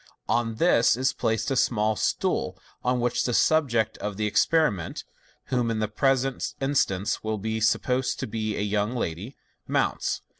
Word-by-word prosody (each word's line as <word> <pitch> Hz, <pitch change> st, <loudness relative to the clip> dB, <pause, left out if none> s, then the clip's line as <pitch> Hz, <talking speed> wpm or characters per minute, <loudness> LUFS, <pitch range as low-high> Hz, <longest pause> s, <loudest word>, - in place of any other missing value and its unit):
On 115 Hz, -1 st, 0 dB
this 120 Hz, -5 st, +4 dB
is 130 Hz, +1 st, +1 dB
placed 110 Hz, +5 st, -1 dB
a -, -, +1 dB
small 110 Hz, -3 st, +2 dB
stool, -, -, -1 dB, 0.3 s
on 125 Hz, 0 st, +1 dB
which 120 Hz, 0 st, 0 dB
the 120 Hz, -, 0 dB
subject 125 Hz, -9 st, +2 dB
of 105 Hz, -1 st, -4 dB
the 105 Hz, 0 st, 0 dB
experi 155 Hz, +7 st, +3 dB
ment 85 Hz, -4 st, -6 dB, 0.5 s
(whom, 120 Hz, -2 st, +1 dB
in 115 Hz, -, -1 dB
the 110 Hz, 0 st, 0 dB
present 135 Hz, +4 st, 0 dB
instance, 120 Hz, -8 st, 0 dB
we 110 Hz, -, -4 dB
will 110 Hz, +2 st, -3 dB
suppose 125 Hz, +3 st, +1 dB
to -, -, -4 dB
bs 110 Hz, -1 st, -3 dB
a 105 Hz, 0 st, -2 dB
voung 105 Hz, +3 st, 0 dB
lady) 100 Hz, -, -4 dB, 0.3 s
mounts. -, -, 0 dB
115 Hz, 165 wpm, -26 LUFS, 105-130 Hz, 0.5 s, this